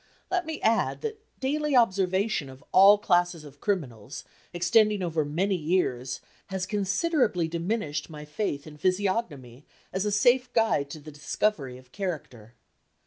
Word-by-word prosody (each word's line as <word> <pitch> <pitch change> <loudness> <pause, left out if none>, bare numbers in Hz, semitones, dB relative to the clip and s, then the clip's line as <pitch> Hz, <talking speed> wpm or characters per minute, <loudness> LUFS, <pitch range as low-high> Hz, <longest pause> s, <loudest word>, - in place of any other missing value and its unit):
Let 360 -3 0
me 320 -1 -4
add 225 0 +2
that 450 -2 -4 0.2
daily 290 +2 0
observation 190 - +2
of 130 0 -13
all 200 +2 +8
classes 175 -4 +1
of 145 -1 -14
criminals, 135 - -3 0.3
extending 210 +3 +3
over 165 -3 0
many 175 +7 0
years, 150 -7 -1 0.3
has 190 -1 -3
considerably 210 - +1
diminished 170 -2 -2
my 150 -1 -9
faith 150 -2 -3
in 150 -1 -11
physiognomy 180 - -1 0.3
as 190 +1 0
a 210 - 0
safe 245 +5 +3
guide 220 -11 +2
to 155 - -8
the 155 +1 -11
discovery 145 -2 -1
of 130 0 -18
character. 130 - -6
185 Hz, 140 wpm, -27 LUFS, 145-210 Hz, 0.3 s, all